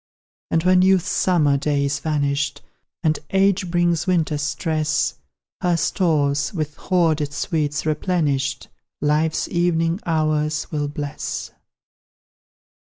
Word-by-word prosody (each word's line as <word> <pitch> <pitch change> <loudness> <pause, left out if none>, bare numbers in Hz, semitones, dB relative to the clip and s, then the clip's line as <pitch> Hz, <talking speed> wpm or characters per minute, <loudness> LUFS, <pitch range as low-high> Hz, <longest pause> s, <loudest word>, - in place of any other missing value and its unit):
And 165 - +1
when 185 0 +5
Youth's 190 -1 +3
summer 155 -6 +2
day 145 0 0
is 140 0 -1
vanished, 145 -2 -1 0.4
And 155 -2 +2
Age 195 -1 +2
brings 175 0 +1
Winter's 160 -5 +1
stress, 155 0 0 0.5
Her 175 -1 +2
stores, 145 -5 +1
with 155 -3 -2
hoarded 160 -5 +1
sweets 150 0 -2
replenished, 150 -4 0 0.3
Life's 150 +2 +1
evening 170 0 +1
hours 155 -2 0
will 145 -1 -1
bless. 145 0 -5
155 Hz, 105 wpm, -22 LUFS, 145-175 Hz, 0.5 s, when